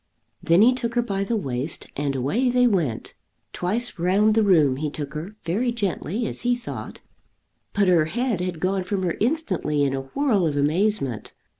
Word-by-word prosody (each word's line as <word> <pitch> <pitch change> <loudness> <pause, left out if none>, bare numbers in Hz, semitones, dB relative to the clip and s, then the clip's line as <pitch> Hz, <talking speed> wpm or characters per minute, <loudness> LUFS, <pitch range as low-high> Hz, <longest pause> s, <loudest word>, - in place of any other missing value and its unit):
Then 170 +5 +4
he 250 +3 +6
took 240 -2 -4
her 240 - +2
by 195 -3 -2
the 230 +4 -1
waist, 135 -3 -3
and 140 -1 -1
away 175 - +1
they 250 0 +3
went. 170 - 0 0.4
Twice 210 +3 -2
round 200 +5 +3
the 225 - +3
room 155 -10 +4
he 150 +1 -2
took 145 -1 -6
her, 170 +8 -6
very 220 +9 0
gently, 215 0 -2
as - - -4
he 245 0 +2
thought; 240 -1 -8 0.7
but 200 -2 +2
her 170 -4 +4
head 230 +2 -1
had 180 -3 -3
gone 185 +2 0
from 190 +1 -2
her 175 - 0
instantly 210 - 0
in 135 -1 +1
a 135 - -2
whirl 235 - +2
of 145 -2 -2
amazement! 150 - 0
190 Hz, 185 wpm, -24 LUFS, 155-230 Hz, 0.7 s, he